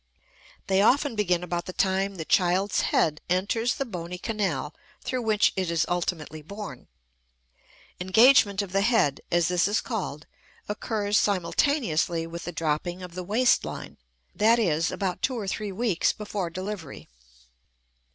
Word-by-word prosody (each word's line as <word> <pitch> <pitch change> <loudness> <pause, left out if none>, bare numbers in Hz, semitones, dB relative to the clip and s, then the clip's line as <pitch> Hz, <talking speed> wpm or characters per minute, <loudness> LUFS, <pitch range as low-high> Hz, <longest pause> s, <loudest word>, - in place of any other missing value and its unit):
They 190 0 +2
often 270 +5 +3
begin 180 -4 +1
about 175 -1 -3
the 185 - -6
time 195 +1 0
the 160 -3 -5
child's 185 +3 +2
head 150 -1 +1
enters 205 +7 +1
the 275 - -2
bony 180 -5 -6
canal 180 -9 -2 0.3
through 255 - -2
which 215 -2 +2
it 185 -3 -1
is 165 -2 +1
ultimately 165 -3 -3
born; 165 -5 -9 1.1
engagement 200 +1 +5
of 195 - -8
the 195 +1 +2
head, 200 - +2
as 170 -1 +3
this 180 +1 +2
is 205 +2 +1
called, 185 - -4 0.4
occurs 210 0 0
simultaneously 180 - +1
with 170 +1 -7
the 175 - -4
dropping 165 +3 -2
of 180 -1 -9
the 180 +1 -5
waist 230 +7 +3
line, - - -7 0.3
that 225 +3 +4
is, 165 -7 +1
about 185 -3 -3
two 260 -2 0
or 205 -4 -4
three 205 +1 -3
weeks 200 -3 +1
before 205 -4 -4
delivery. 185 -3 -7
190 Hz, 150 wpm, -26 LUFS, 170-210 Hz, 1.1 s, engagement